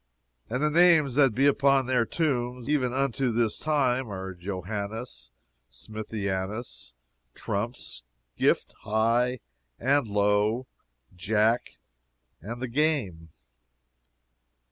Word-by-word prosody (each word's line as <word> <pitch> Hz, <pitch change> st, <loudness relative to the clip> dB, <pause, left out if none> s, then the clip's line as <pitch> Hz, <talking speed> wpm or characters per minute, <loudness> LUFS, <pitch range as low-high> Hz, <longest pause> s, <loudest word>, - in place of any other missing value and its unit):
And 125 Hz, +5 st, -1 dB
the 150 Hz, -, +2 dB
names 165 Hz, -5 st, +5 dB
that 135 Hz, -4 st, +4 dB
be 135 Hz, +3 st, +3 dB
upon 140 Hz, -1 st, +4 dB
their 125 Hz, -2 st, +2 dB
tombs, 125 Hz, -6 st, -1 dB
even 140 Hz, -4 st, +1 dB
unto 135 Hz, -1 st, 0 dB
this 115 Hz, -1 st, 0 dB
time, 130 Hz, -5 st, +1 dB
are 95 Hz, -1 st, -5 dB
Johannes 100 Hz, -, -6 dB, 0.4 s
Smithianus, 100 Hz, -, -5 dB, 0.4 s
Trumps, 100 Hz, -, -4 dB, 0.3 s
Gift, -, -, +1 dB
High, 115 Hz, +3 st, +1 dB, 0.4 s
and 135 Hz, 0 st, +2 dB
Low, 105 Hz, +4 st, +1 dB, 0.5 s
Jack, 110 Hz, +6 st, +1 dB, 0.7 s
and 120 Hz, +7 st, -6 dB
The -, -, -1 dB
Game. 115 Hz, -, -1 dB
120 Hz, 100 wpm, -27 LUFS, 105-135 Hz, 0.7 s, names